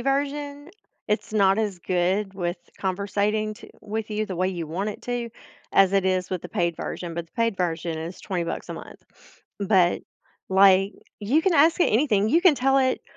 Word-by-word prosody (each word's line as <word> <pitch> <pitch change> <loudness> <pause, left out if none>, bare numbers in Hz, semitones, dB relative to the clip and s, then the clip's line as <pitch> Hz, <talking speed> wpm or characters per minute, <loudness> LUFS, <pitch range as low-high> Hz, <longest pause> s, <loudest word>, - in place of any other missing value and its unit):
version, 285 +3 -2 0.4
it's 210 +1 -1
not 200 -2 +3
as 205 -5 -1
good 185 +3 0
with 175 -2 -3 0.2
conversating 205 +3 -1
to - - -13
with 215 +1 -4
you 215 0 -1
the 185 -4 -6
way 185 +1 +1
you 170 -4 -4
want 185 +7 -3
it 210 - -7
to, 245 -1 -3 0.4
as 195 -1 +5
it 195 -1 +2
is 185 -1 0
with 185 - -2
the - - -8
paid 170 -1 0
version, 170 +1 -5
but 170 0 -5
the - - -38
paid 230 -3 0
version 165 -2 -2
is 165 +3 -6
twenty 180 -3 -2
bucks - - -5
a - - -4
month, - - -11 0.6
but, 190 -3 +3 0.5
like, 195 +1 +5 0.3
you 260 +10 +2
can 380 - +2
ask 320 +2 +5
it - - +3
anything, 220 -4 +2
you 330 - +4
can 345 -5 +6
tell 270 +1 +2
it, 260 -1 +1
200 Hz, 195 wpm, -25 LUFS, 185-235 Hz, 0.6 s, can